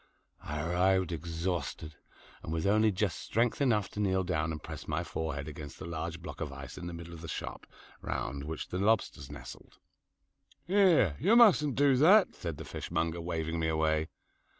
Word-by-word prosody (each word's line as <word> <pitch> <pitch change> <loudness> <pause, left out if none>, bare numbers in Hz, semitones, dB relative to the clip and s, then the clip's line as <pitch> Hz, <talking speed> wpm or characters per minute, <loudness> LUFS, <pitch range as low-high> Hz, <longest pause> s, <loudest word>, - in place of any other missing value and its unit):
I 75 0 -4
arrived 90 +1 +2
exhausted, 85 -1 -3 0.5
and - - -6
with 80 -1 -1
only 110 +2 +4
just 95 -1 -1
strength 115 +4 0
enough 110 -8 +2
to - - -8
kneel 95 -2 +2
down 80 -3 -1
and 80 - -4
press 80 -1 -8
my - - -1
forehead 70 -3 -4
against 75 -1 -8
the - - -8
large 85 0 -5
block 80 -2 -8
of 75 -4 -3
ice 70 0 -8
in 85 - -7
the 85 - -5
middle 85 0 -8
of 80 - -9
the 85 - -7
shop, - - -6 0.3
round 70 0 -3
which 80 0 -5
the 90 - -3
lobsters 100 -9 +1
nestled. 75 - -11 0.9
"Here, 175 - +4
you 200 +9 +4
mustn't 175 - +6
do 140 -2 +4
that," 185 +9 +6
said 85 -4 -5
the - - -7
fishmonger, 85 +1 -2
waving 80 -1 -2
me 80 - 0
away. 80 0 +1
85 Hz, 180 wpm, -31 LUFS, 80-105 Hz, 0.9 s, mustn't